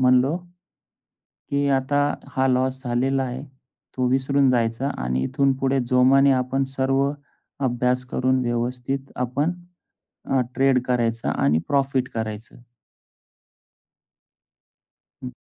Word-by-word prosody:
म्हणालो 130 Hz, +4 st, +4 dB, 1.1 s
की 140 Hz, 0 st, +1 dB
आता 135 Hz, +1 st, +1 dB, 0.4 s
हा 130 Hz, 0 st, +2 dB
लॉस 130 Hz, +1 st, 0 dB
झालेला 130 Hz, +2 st, 0 dB
आहे. 130 Hz, +2 st, -5 dB, 0.5 s
तो 125 Hz, -, +1 dB
विसरून 135 Hz, +1 st, +2 dB
जायचा 120 Hz, +2 st, 0 dB
आणि 65 Hz, +1 st, -1 dB
इथून 135 Hz, -, +1 dB
पुढे 135 Hz, 0 st, +1 dB
जोमाने 135 Hz, +2 st, +5 dB
आपण 130 Hz, +1 st, +1 dB
सर्व 135 Hz, +1 st, +2 dB, 0.6 s
अभ्यास 125 Hz, 0 st, 0 dB
करून 130 Hz, 0 st, +1 dB
व्यवस्थित 125 Hz, +3 st, -2 dB
आपण 135 Hz, +7 st, -1 dB, 0.7 s
अ, 135 Hz, -, +1 dB
ट्रेड 135 Hz, -1 st, +3 dB
करायचं 115 Hz, -2 st, 0 dB
आणि 75 Hz, +3 st, +2 dB
प्रॉफिट 135 Hz, -2 st, +1 dB
करायचं. 110 Hz, -1 st, -5 dB, 2.7 s
हं. 125 Hz, -, -5 dB
130 Hz, 105 wpm, -23 LUFS, 125-135 Hz, 2.7 s, जोमाने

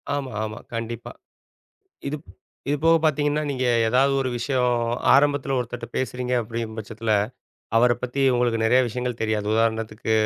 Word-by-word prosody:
ஆமா, 135 Hz, -3 st, -4 dB
ஆமா. 110 Hz, +1 st, -5 dB
கண்டிப்பா. 115 Hz, 0 st, -5 dB, 1.0 s
இதுப் 150 Hz, +2 st, -6 dB, 0.4 s
இது 145 Hz, -, +2 dB
போக 165 Hz, 0 st, +6 dB
பார்த்தீங்கன்னா, 150 Hz, 0 st, +1 dB
நீங்க 130 Hz, -2 st, -1 dB, 0.2 s
ஏதாவது 135 Hz, +4 st, +3 dB
ஒரு 130 Hz, -, 0 dB
விஷயம் 125 Hz, -1 st, +1 dB, 0.4 s
ஆரம்பத்தில 140 Hz, -1 st, +3 dB
ஒருத்தர்ட்ட 120 Hz, -1 st, -4 dB
பேசுறீங்க. 125 Hz, 0 st, -2 dB
அப்டின்ற 115 Hz, 0 st, -5 dB
பட்சத்தில 110 Hz, +1 st, -3 dB, 0.6 s
அவர 120 Hz, +1 st, +5 dB
பத்தி 125 Hz, +2 st, -3 dB
உங்களுக்கு 120 Hz, -2 st, +1 dB
நெறைய 125 Hz, +3 st, +5 dB
விஷயங்கள் 125 Hz, +1 st, -4 dB
தெரியாது. 110 Hz, -2 st, -1 dB
உதாரணத்துக்கு 110 Hz, 0 st, 0 dB
125 Hz, 135 wpm, -24 LUFS, 115-135 Hz, 1.0 s, போக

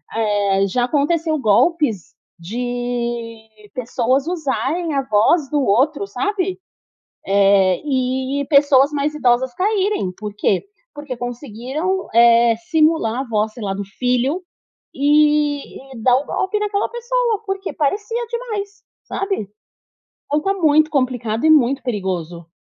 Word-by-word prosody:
eh, 205 Hz, -3 st, +1 dB
já 245 Hz, +6 st, 0 dB
aconteceu 310 Hz, +4 st, 0 dB
golpes 225 Hz, -, +1 dB, 0.2 s
de 235 Hz, 0 st, -5 dB
pessoas 255 Hz, +2 st, 0 dB
usarem 320 Hz, 0 st, -2 dB
a 275 Hz, -, +1 dB
voz 260 Hz, +7 st, +2 dB
do 295 Hz, 0 st, +1 dB
outro, 255 Hz, +4 st, +2 dB
sabe? 370 Hz, -, -2 dB, 0.7 s
Eh, 195 Hz, -2 st, +3 dB
e 265 Hz, 0 st, -1 dB
pessoas 280 Hz, -1 st, +5 dB
mais 295 Hz, +1 st, -1 dB
idosas 250 Hz, -3 st, +1 dB
caírem, 390 Hz, -, 0 dB
por 210 Hz, -1 st, -6 dB
quê? 200 Hz, -2 st, +1 dB, 0.3 s
Porque 290 Hz, -3 st, -6 dB
conseguiram, 255 Hz, -, -4 dB
eh, 235 Hz, 0 st, +6 dB, 0.2 s
simular 310 Hz, -7 st, +2 dB
a -, -, -2 dB
voz, 220 Hz, -3 st, -1 dB
sei 235 Hz, -, -10 dB
lá, 195 Hz, -2 st, -2 dB
do 200 Hz, +1 st, -4 dB
filho, 250 Hz, -, -1 dB, 0.5 s
e 290 Hz, -1 st, +1 dB
e -, -, -10 dB
dar 250 Hz, 0 st, +5 dB
o 280 Hz, -, -3 dB
golpe 385 Hz, +7 st, -1 dB
daquela 415 Hz, -1 st, -1 dB
pessoa, 475 Hz, -2 st, -1 dB
porque 390 Hz, 0 st, -3 dB
parecia 415 Hz, -, -1 dB
demais, 430 Hz, -4 st, -5 dB, 0.2 s
sabe? 390 Hz, -, -3 dB, 0.8 s
Então 295 Hz, -, 0 dB
está 390 Hz, +6 st, -1 dB
muito 310 Hz, -4 st, +3 dB
complicado 245 Hz, -4 st, -1 dB
é -, -, +5 dB
muito 275 Hz, -3 st, +4 dB
perigoso. 180 Hz, -8 st, -4 dB
265 Hz, 125 wpm, -19 LUFS, 230-315 Hz, 0.8 s, eh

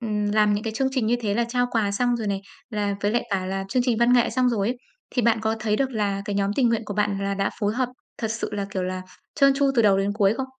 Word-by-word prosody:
ừm, 210 Hz, -3 st, -1 dB
làm 210 Hz, -1 st, +4 dB
những 205 Hz, +2 st, -3 dB
cái 225 Hz, -, -2 dB
chương 265 Hz, +4 st, 0 dB
trình 260 Hz, -5 st, 0 dB
như 240 Hz, -, +2 dB
thế 205 Hz, -3 st, -1 dB
là 235 Hz, -, +2 dB
trao 245 Hz, 0 st, +1 dB
quà 220 Hz, -3 st, +1 dB
xong 245 Hz, +3 st, +1 dB
rồi 225 Hz, -2 st, -4 dB
này, 200 Hz, -1 st, -1 dB, 0.3 s
là 205 Hz, -2 st, -1 dB
với 205 Hz, -, +1 dB
lại 240 Hz, +2 st, +1 dB
cả 190 Hz, -2 st, -1 dB
là 195 Hz, +1 st, -3 dB
chương 250 Hz, +5 st, +1 dB
trình 245 Hz, -3 st, +1 dB
văn 235 Hz, +1 st, +4 dB
nghệ 245 Hz, -1 st, +4 dB
xong 255 Hz, -1 st, +2 dB
rồi 210 Hz, -3 st, 0 dB
ấy, 250 Hz, -, -2 dB, 0.3 s
thì 245 Hz, -, 0 dB
bạn 230 Hz, 0 st, +3 dB
có 220 Hz, 0 st, 0 dB
thấy 215 Hz, -1 st, 0 dB
được 270 Hz, +1 st, 0 dB
là 205 Hz, -4 st, -1 dB
cái 205 Hz, -2 st, -3 dB
nhóm 200 Hz, 0 st, +1 dB
tình 255 Hz, -3 st, +4 dB
nguyện 230 Hz, 0 st, +1 dB
của 205 Hz, -, -5 dB
bạn 205 Hz, -1 st, 0 dB
là 200 Hz, 0 st, -1 dB
đã 195 Hz, 0 st, 0 dB
phối 205 Hz, 0 st, 0 dB
hợp 255 Hz, 0 st, 0 dB, 0.3 s
thật 225 Hz, -, -2 dB
sự 230 Hz, +1 st, -3 dB
là, 200 Hz, -1 st, -2 dB
kiểu 190 Hz, -, -2 dB
là, 185 Hz, 0 st, -3 dB, 0.3 s
trơn 275 Hz, -1 st, +5 dB
tru 275 Hz, 0 st, +2 dB
từ 235 Hz, -, +4 dB
đầu 195 Hz, -2 st, +4 dB
đến 200 Hz, +1 st, 0 dB
cuối 205 Hz, 0 st, +2 dB
không? 265 Hz, -, -2 dB
215 Hz, 305 wpm, -24 LUFS, 200-240 Hz, 0.3 s, trơn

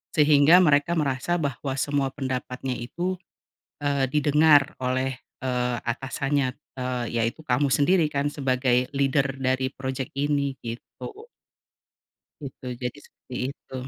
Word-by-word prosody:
Sehingga 150 Hz, +2 st, +6 dB
mereka 145 Hz, 0 st, +3 dB
merasa 145 Hz, +3 st, 0 dB
bahwa 140 Hz, -2 st, -2 dB
semua 140 Hz, -1 st, 0 dB
pendapatnya 130 Hz, -1 st, -3 dB
itu, 175 Hz, +11 st, -3 dB, 0.7 s
eee, 140 Hz, -2 st, +1 dB
didengar 150 Hz, -1 st, +4 dB
oleh, 130 Hz, +1 st, 0 dB, 0.3 s
eee, 125 Hz, -1 st, 0 dB
atasannya, 135 Hz, +2 st, -1 dB, 0.2 s
eee, 125 Hz, -1 st, -2 dB, 0.2 s
yaitu 115 Hz, +6 st, -1 dB
kamu 130 Hz, +2 st, +2 dB
sendiri 160 Hz, +3 st, +3 dB
kan 140 Hz, 0 st, 0 dB
sebagai 130 Hz, -2 st, +1 dB
leader 140 Hz, 0 st, +1 dB
dari 130 Hz, 0 st, +1 dB
project 130 Hz, -1 st, -4 dB
ini, 140 Hz, -1 st, 0 dB
gitu. 405 Hz, -, -8 dB, 1.1 s
Gitu, 135 Hz, -3 st, -9 dB, 0.2 s
jadi 125 Hz, +3 st, -4 dB
seperti 130 Hz, -, -14 dB, 0.2 s
itu. 140 Hz, -, -14 dB
135 Hz, 115 wpm, -25 LUFS, 130-145 Hz, 1.1 s, Sehingga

